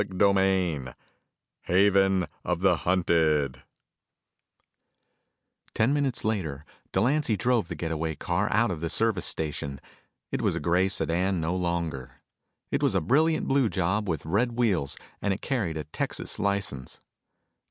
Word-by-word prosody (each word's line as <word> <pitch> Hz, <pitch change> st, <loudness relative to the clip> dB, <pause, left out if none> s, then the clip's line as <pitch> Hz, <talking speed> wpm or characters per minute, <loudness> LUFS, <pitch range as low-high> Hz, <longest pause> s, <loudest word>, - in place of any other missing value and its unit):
CHAPTER 100 Hz, 0 st, +2 dB
III 90 Hz, -10 st, 0 dB, 0.7 s
Haven 95 Hz, 0 st, +3 dB, 0.2 s
Of 90 Hz, -1 st, -1 dB
The 95 Hz, -3 st, +4 dB
Hunted 80 Hz, -7 st, +1 dB, 2.1 s
Ten 115 Hz, +5 st, +3 dB
minutes 140 Hz, -6 st, 0 dB
later, 80 Hz, -10 st, -2 dB, 0.3 s
Delancy 120 Hz, +2 st, +1 dB
drove 120 Hz, -4 st, +1 dB
the -, -, -5 dB
get 80 Hz, -1 st, -4 dB
away 80 Hz, 0 st, -2 dB
car 90 Hz, +7 st, -1 dB
out 115 Hz, -1 st, +3 dB
of 80 Hz, -3 st, -5 dB
the 85 Hz, -, -2 dB
service 110 Hz, -1 st, +1 dB
station. 70 Hz, -3 st, -2 dB, 0.5 s
It -, -, -1 dB
was -, -, +1 dB
a -, -, -1 dB
gray 90 Hz, +3 st, +2 dB
sedan 90 Hz, 0 st, 0 dB
no 80 Hz, +3 st, -1 dB
longer. 85 Hz, -7 st, -3 dB, 0.5 s
It -, -, 0 dB
was -, -, +2 dB
a -, -, +4 dB
brilliant 155 Hz, -, +2 dB
blue 135 Hz, -4 st, +3 dB
job 95 Hz, +3 st, -1 dB
with 80 Hz, -3 st, -2 dB
red 110 Hz, +9 st, +1 dB
wheels, 100 Hz, -, +1 dB, 0.2 s
and 100 Hz, -1 st, +1 dB
it -, -, -12 dB
carried 105 Hz, -, -1 dB
a 75 Hz, -, -3 dB
Texas 75 Hz, -, -4 dB
license. 95 Hz, -10 st, -2 dB
95 Hz, 140 wpm, -27 LUFS, 80-105 Hz, 2.1 s, The